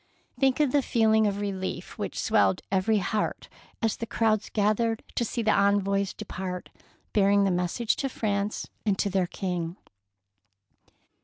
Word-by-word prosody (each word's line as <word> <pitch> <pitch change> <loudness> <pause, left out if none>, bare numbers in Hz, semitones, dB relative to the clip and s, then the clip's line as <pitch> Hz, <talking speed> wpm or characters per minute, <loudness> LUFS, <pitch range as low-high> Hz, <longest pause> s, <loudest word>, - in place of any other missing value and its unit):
Think 265 +1 +3
of 295 -4 +3
the 285 - +3
feeling 220 -3 +3
of 200 0 -1
relief 195 -2 -4
which - - -4
swelled 95 -2 +2
every 200 +3 +2
heart 210 +2 -2 0.4
as 225 -1 +1
the 230 - -4
crowds 220 -2 +1
gathered 220 +2 +1
to - - 0
see 235 +1 -2
the 215 - +3
envoys 200 -1 +2
depart 185 -3 -5 0.4
bearing 200 -1 +4
the 195 - +2
message 180 +6 0
to 270 - -1
Prance 205 -3 -2 0.2
and 205 -3 +1
to 200 - 0
their 185 -2 +1
King! 175 -2 -3
205 Hz, 150 wpm, -27 LUFS, 190-220 Hz, 0.4 s, bearing